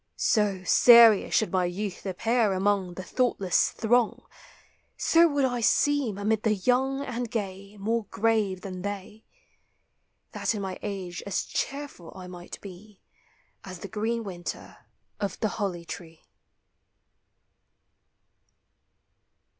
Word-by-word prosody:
So, 205 -4 +1
serious 230 0 +7
should 220 - +2
my 185 -2 +1
youth 190 +2 -4
appear 225 +2 +1
among 190 -2 0
The 185 - -6
thoughtless 200 -5 +1
throng; 235 0 +1 0.7
So 335 +1 +5
would 285 -3 0
1 245 -2 -1
seem, 270 -2 +2
amid 215 +1 0
the 215 -1 +2
young 265 +6 +1
and 245 -2 -4
gay, 200 -1 -5
More 225 +2 -1
grave 205 -3 0
than 185 -2 -7
they; 205 +2 -6 1.1
That - - -1
in 205 - -4
my 190 -1 -5
age 190 -4 -5
as 195 - -1
cheerful 275 - -5
I 185 -1 -9
might 180 -1 -9
be 200 +1 -12 0.6
As 185 -1 -8
the - - -6
green 225 +3 -2
winter 180 -4 -7 0.4
of 200 -3 -3
the 215 - 0
holly 175 -4 -2
tree. 165 -1 -9
205 Hz, 120 wpm, -27 LUFS, 185-230 Hz, 1.1 s, serious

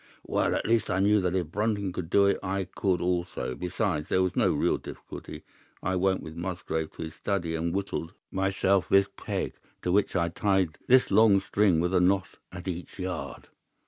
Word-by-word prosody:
"Well, - - +1
at - - -2
least 115 -1 +2
I 90 - +1
knew 100 +2 +4
that 90 0 0
if 85 -4 -1
Brunton 100 -2 -1
could 90 -3 -5
do 100 +2 +5
it, 100 - +2
I 95 0 -1
could 95 -1 -1
also. 90 -6 -1
Besides, 75 -2 -2
there 95 - +3
was 95 - -1
no - - +3
real - - +1
difficulty. - - -9 0.4
I 95 +1 0
went 95 +1 +1
with 80 0 -8
Musgrave 85 -2 -3
to - - -6
his 80 -1 -7
study 85 -3 -2
and 80 +1 -1
whittled 95 -3 -3 0.2
myself 95 0 +1
this 100 0 +4
peg, - - -4 0.3
to 90 - 0
which 100 +1 +2
I 85 -2 +2
tied 95 -2 0
this 130 0 +5
long 110 -3 +6
string 95 -3 +2
with 90 +2 0
a 90 - +4
knot 95 0 +1
at 90 +1 -8
each 90 -1 -5
yard. 90 -3 -5
95 Hz, 195 wpm, -28 LUFS, 85-100 Hz, 0.4 s, long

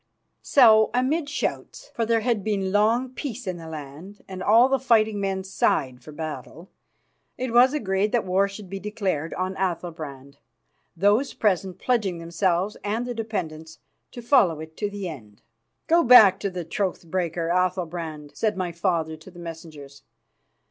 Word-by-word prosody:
So, 220 -5 +6
amidst 285 +4 0
shouts, - - -4
for 230 -1 -1
there 230 -1 +2
had 225 -3 0
been 195 -3 -1
long 225 +5 +2
peace 255 -2 -6
in 185 -2 -3
the 165 -1 -10
land, 155 +6 -9
and 185 -1 -7
all 225 +6 +5
the 270 0 +1
fighting 220 -4 +2
men 190 -1 -2
sighed 130 -9 0
for 155 - -11
battle, 160 +3 -8 0.7
it 250 -2 -3
was 255 +4 +5
agreed 205 -5 0
that 240 -4 +1
war 190 +2 +2
should 200 0 -10
be 195 +1 -6
declared 195 -7 -3
on 185 +1 -2
Athalbrand, 160 -7 -5 0.6
those 205 +9 +2
present 190 -3 0
pledging 215 -8 0
themselves 170 +3 -1
and 220 +4 -2
their 245 - -4
dependents 160 -9 -5 0.3
to 240 - -9
follow 185 - +3
it 160 0 -10
to 205 - -2
the 200 -2 -5
end. 110 -11 -11 0.4
"Go 335 +1 +4
back 235 -6 +8
to 200 - -2
the 180 -2 -6
troth 185 +1 -3
breaker, 170 -1 -2
Athalbrand," 170 -4 -2
said 215 -3 -1
my 180 -2 -2
father 170 -2 -1
to 160 +4 -14
the 175 - -16
messengers. 160 -4 -10
190 Hz, 160 wpm, -24 LUFS, 165-220 Hz, 0.7 s, back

